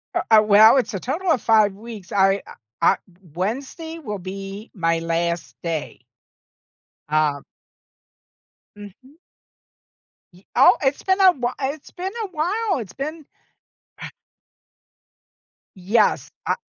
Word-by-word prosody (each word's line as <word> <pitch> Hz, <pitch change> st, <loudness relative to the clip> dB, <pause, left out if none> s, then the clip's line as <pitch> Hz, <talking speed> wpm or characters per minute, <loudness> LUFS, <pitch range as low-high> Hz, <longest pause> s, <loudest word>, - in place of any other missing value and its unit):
U -, -, +2 dB
uh, 220 Hz, -1 st, +8 dB
well, 215 Hz, +3 st, +6 dB
it's 235 Hz, -5 st, 0 dB
a 195 Hz, -, -2 dB
total 330 Hz, -, -1 dB
of 265 Hz, -, +2 dB
5 215 Hz, -3 st, +4 dB
weeks. 210 Hz, -2 st, -11 dB
I 195 Hz, 0 st, +3 dB
I -, -, -11 dB, 0.3 s
I 175 Hz, +3 st, +4 dB, 0.4 s
Wednesday 275 Hz, -, -4 dB
will 210 Hz, -9 st, -5 dB
be 195 Hz, +3 st, -8 dB
my 165 Hz, -4 st, 0 dB
last 170 Hz, 0 st, -2 dB
day. 165 Hz, -7 st, -4 dB, 1.1 s
Um. 150 Hz, -2 st, +1 dB, 1.3 s
Mhm. 210 Hz, -, -14 dB, 1.2 s
Y 180 Hz, +2 st, -20 dB
oh, -, -, +6 dB
it's 275 Hz, +1 st, +1 dB
been 380 Hz, 0 st, +1 dB
a 380 Hz, -1 st, +7 dB
whi 250 Hz, -6 st, -3 dB, 0.2 s
it's 310 Hz, -, -14 dB
been 375 Hz, +2 st, -6 dB
a -, -, -6 dB
while, 380 Hz, +4 st, -1 dB
it's 215 Hz, -8 st, -7 dB
been 305 Hz, +3 st, -6 dB, 2.5 s
Yes, 205 Hz, +4 st, +1 dB, 0.2 s
I -, -, +2 dB
215 Hz, 120 wpm, -22 LUFS, 185-295 Hz, 2.5 s, uh